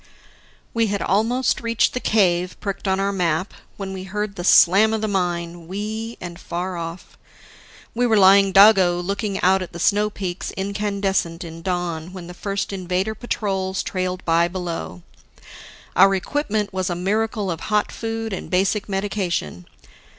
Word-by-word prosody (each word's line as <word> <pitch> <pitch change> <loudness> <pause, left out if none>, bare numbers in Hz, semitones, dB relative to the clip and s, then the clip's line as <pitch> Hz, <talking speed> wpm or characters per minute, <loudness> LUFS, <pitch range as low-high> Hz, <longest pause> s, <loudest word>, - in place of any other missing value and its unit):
We 230 -1 +2
had 200 0 -2
almost 230 +6 +1
reached 230 -1 +1
the 250 - -1
cave 180 -6 +1
pricked 200 -1 -4
on 190 0 +1
our 195 0 +1
map, 180 -1 -1 0.2
when 195 -1 -5
we 190 0 -6
heard 210 +1 -3
the 175 - -5
slam 200 +5 +6
of 220 - -3
the 215 - 0
mine, 175 -3 -2
wee 215 +4 -5
and 175 -1 -8
far 180 0 -4
off. 165 +1 -7 0.7
We 245 +1 +1
were 220 -2 +3
lying 195 0 +6
doggo 190 -3 +6
looking 200 +2 -2
out 190 +1 +4
at 185 - -7
the 170 - -7
snow 210 +4 +2
peaks 185 -3 -5
incandescent 195 -3 -1
in 165 0 -9
dawn 175 -1 -3
when 185 -2 -8
the 180 - -9
first 200 +2 -3
Invader 185 +2 -1
patrols 195 -5 -2
trailed 185 -1 -3
by 170 0 +3
below. 170 - -5 0.9
Our 195 0 +6
equipment 210 -1 -2
was 185 -1 -1
a 175 - -1
miracle 210 +2 -1
of 165 - -4
hot 210 -1 +1
food 225 -1 -4
and 190 - -6
basic 195 +3 +1
medication. 190 - -2
190 Hz, 160 wpm, -22 LUFS, 175-210 Hz, 0.9 s, slam